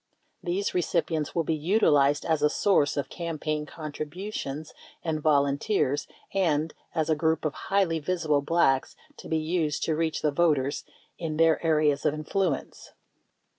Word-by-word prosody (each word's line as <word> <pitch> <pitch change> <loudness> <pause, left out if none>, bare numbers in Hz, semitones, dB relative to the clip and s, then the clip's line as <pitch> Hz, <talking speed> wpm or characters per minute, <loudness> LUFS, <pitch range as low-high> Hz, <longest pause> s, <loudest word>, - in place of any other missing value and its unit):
These 185 +3 -1
recipi 170 -1 0
ents 150 -1 -3
will 165 - +2
be 160 - 0
utilized 150 -4 +3
as 160 -2 +1
a 150 - +4
source 150 -5 +2
of 140 - -1
campaign 155 -3 -3
contributions 155 0 -6 0.3
and 155 -2 -2
volunteers, 145 +1 +1 0.3
and 160 -5 +1 0.2
as 160 -2 +1
a 160 - +2
group 160 +1 0
of 150 - 0
highly 190 -4 0
visible 155 -3 0
Blacks 140 -3 +2 0.2
to - - -10
be 160 - +1
used 155 -1 -1
to 160 - 0
reach 160 0 -1
the 150 - +3
voters 145 -3 +1 0.3
in 160 -3 -3
their 165 0 +3
areas 150 -3 +2
of 150 - +1
influence. 155 0 -2
155 Hz, 150 wpm, -27 LUFS, 150-170 Hz, 0.3 s, a